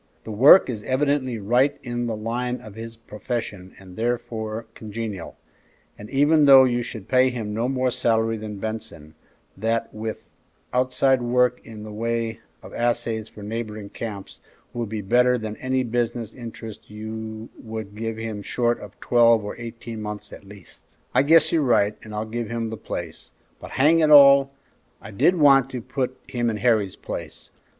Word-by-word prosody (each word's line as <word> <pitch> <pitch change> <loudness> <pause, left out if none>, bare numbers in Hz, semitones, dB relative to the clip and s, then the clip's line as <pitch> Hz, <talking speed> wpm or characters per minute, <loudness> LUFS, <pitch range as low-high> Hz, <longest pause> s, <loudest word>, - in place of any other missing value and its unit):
The 110 - -7
work 135 - +7
is 115 -4 -4
evidently 130 0 0
right 125 +7 +2
in 120 -1 -3
the 115 - -2
line 120 +3 -3
of 110 -4 -12
his 115 +2 -8
profession, 105 -4 -6
and 95 -2 -14
therefore 115 -1 -3
congenial; 110 -4 -6 0.6
and 105 +1 -11
even 145 +2 +4
though 135 -1 +9
you 120 -1 +1
should 110 -4 -8
pay 130 +1 +4
him 115 -4 -4
no 115 +4 -1
more 130 -1 0
salary 115 -1 +1
than 105 -1 -7
Benson, 110 -8 -6 0.4
that, 115 +3 -2
with 110 0 -5 0.5
outside 130 +1 +2
work 125 0 +2
in 110 -2 -10
the 105 - -8
way 115 +1 -2 0.2
of - - -11
assays 115 -2 -1
for 105 - -12
neighboring 110 -1 -5
camps, 100 -4 -7 0.3
will 120 -1 -3
be 110 0 -4
better 125 +5 +3
than 110 -2 -5
any 130 0 -1
business 120 -1 -2
interest 115 -3 -9
you 110 +1 -7
would 110 -2 -7
give 115 0 -4
him 110 -2 -5
short 120 +3 0
of 105 -1 -12
twelve 115 -3 +4
or 105 - -5
eighteen 115 -1 -7
months 105 0 -7
at - - -11
least." 100 -1 -15 0.2
"I - - +5
guess 160 +4 +5
you're 165 - +2
right, 105 -6 +2
and 110 - -11
I'll 105 +1 -3
give 115 0 -4
him 115 -1 -3
the - - -4
place; - - -7 0.3
but - - -10
hang 155 +5 +4
it 155 -2 +3
all! 140 -2 +8 0.5
I - - -11
did 140 - +3
want 135 -5 +5
to 130 - -5
put 130 +2 -3
him 120 -2 -1
in 110 - -2
Harry's 110 -5 +1
place. - - -8
115 Hz, 175 wpm, -23 LUFS, 110-125 Hz, 0.6 s, though